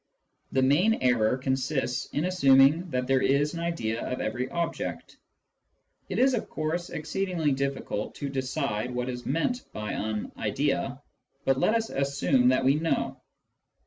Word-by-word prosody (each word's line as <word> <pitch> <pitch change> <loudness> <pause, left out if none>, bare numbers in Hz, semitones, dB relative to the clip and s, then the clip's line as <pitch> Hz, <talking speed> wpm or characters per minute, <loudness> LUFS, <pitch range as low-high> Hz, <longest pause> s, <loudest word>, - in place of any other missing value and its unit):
The 130 - +2
main 175 +12 +4
error 120 - +2
consists 130 -1 -1
in 150 - -2
assuming 150 -1 +5
that 125 -3 -1
there 135 0 +2
is 145 +2 +2
an 170 - -4
idea 140 -10 -2
of 125 - -3
every 120 +4 -2
object. 170 -1 -4 0.9
It - - -3
is, 265 +1 +4
of 235 - -2
course, 160 +3 -2
exceedingly 165 0 -1
difficult 135 -5 -2
to 140 - -4
decide 130 -4 -2
what 125 +1 -2
is 125 -1 -6
meant 165 - 0
by 105 -1 -4
an 110 0 -3
" - - -24
idea - - -1 0.2
"; - - -44
but 135 0 +2
let 215 - +3
us 225 -1 -1
assume 135 -2 +2
that 130 0 +3
we 135 - +5
know. 165 +1 -1
135 Hz, 160 wpm, -27 LUFS, 125-165 Hz, 0.9 s, assuming